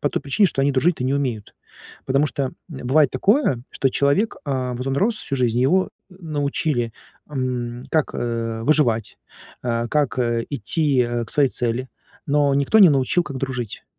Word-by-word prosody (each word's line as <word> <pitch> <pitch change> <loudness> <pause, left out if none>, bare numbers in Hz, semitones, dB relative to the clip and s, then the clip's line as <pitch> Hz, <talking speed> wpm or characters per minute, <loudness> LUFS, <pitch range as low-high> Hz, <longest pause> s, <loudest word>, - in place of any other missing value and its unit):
по 145 - +1
той - - -3
причине, 145 +9 +3
что 135 -5 -1
они 140 0 +2
дружить-то 140 0 +1
не 130 - 0
умеют. 125 -7 -2 0.5
Потому 135 +3 +2
что, 140 0 -2
м, 130 - -4 0.2
бывает 140 0 +2
такое, 200 - +2
что 135 - 0
человек, 140 - +1
а, 130 -2 -1
вот 125 +2 -5
он 135 0 -1
рос 215 +5 +1
всю 140 -9 -4
жизнь, 120 -2 +1
его 180 +9 +2 0.2
н 180 - -16 0.2
научили, 140 -5 -1 0.3
ам, 125 -3 -3
как, 155 -2 0
э, 115 -1 -3
выживать, 120 -7 +1 0.4
э, 120 -1 -1
как, 145 -2 0
э, 120 -1 0
идти, 140 +2 +1
э, 120 -1 0
к - - -11
своей 140 -3 +3
цели, 125 +2 -2 0.4
но 145 -1 +2
никто 140 +10 +3
не 195 - +9
научил, 140 +4 +2
как 140 -5 -7
дружить. 125 -5 -4
135 Hz, 180 wpm, -22 LUFS, 120-145 Hz, 0.5 s, не